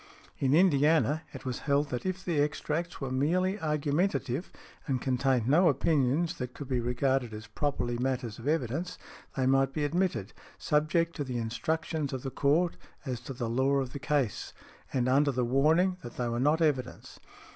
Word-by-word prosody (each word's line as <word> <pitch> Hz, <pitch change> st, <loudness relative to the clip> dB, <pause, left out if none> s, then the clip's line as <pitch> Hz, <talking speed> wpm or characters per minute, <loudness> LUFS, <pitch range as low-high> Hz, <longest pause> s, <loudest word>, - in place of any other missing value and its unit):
In 135 Hz, +1 st, +3 dB
Indiana, 155 Hz, -2 st, +4 dB
it -, -, -10 dB
was 125 Hz, -1 st, -3 dB
held 145 Hz, +1 st, +2 dB
that 125 Hz, +8 st, -3 dB
if 185 Hz, 0 st, -3 dB
the 170 Hz, -5 st, 0 dB
extracts 155 Hz, +3 st, -2 dB
were 135 Hz, -2 st, -4 dB
merely 180 Hz, +9 st, +1 dB
argumentative 150 Hz, -1 st, -1 dB, 0.4 s
and 135 Hz, -3 st, 0 dB
contained 130 Hz, -2 st, +1 dB
no 165 Hz, +6 st, +5 dB
opinions 145 Hz, +2 st, +1 dB
that 125 Hz, -1 st, -5 dB
could 145 Hz, -, -7 dB
be 130 Hz, -2 st, 0 dB
regarded 125 Hz, -1 st, 0 dB
as 110 Hz, +1 st, -8 dB
properly 130 Hz, -5 st, -2 dB
matters 125 Hz, -3 st, -2 dB
of 120 Hz, -, -7 dB
evidence, 160 Hz, +3 st, -1 dB, 0.4 s
they 130 Hz, -, +1 dB
might 135 Hz, 0 st, +3 dB
be 150 Hz, -, -1 dB
admitted, 170 Hz, -, -1 dB, 0.2 s
subject 165 Hz, +3 st, +1 dB
to 145 Hz, -, -1 dB
the 130 Hz, -3 st, -4 dB
instructions 140 Hz, +6 st, -2 dB
of 130 Hz, -, -4 dB
the 135 Hz, -, -4 dB
Court 160 Hz, +7 st, +2 dB, 0.3 s
as 125 Hz, -3 st, -3 dB
to 125 Hz, +3 st, -7 dB
the 120 Hz, -1 st, -3 dB
law 130 Hz, +4 st, +2 dB
of 135 Hz, -2 st, -1 dB
the 140 Hz, -, -5 dB
case 130 Hz, -5 st, -1 dB, 0.4 s
and 125 Hz, -2 st, 0 dB
under 140 Hz, +3 st, +4 dB
the 125 Hz, -2 st, 0 dB
warning 160 Hz, +9 st, +3 dB
that 120 Hz, -, -10 dB
they 125 Hz, -, -1 dB
were 120 Hz, 0 st, -1 dB
not 150 Hz, +5 st, +3 dB
evidence. 140 Hz, -5 st, -2 dB
140 Hz, 180 wpm, -29 LUFS, 125-155 Hz, 0.4 s, no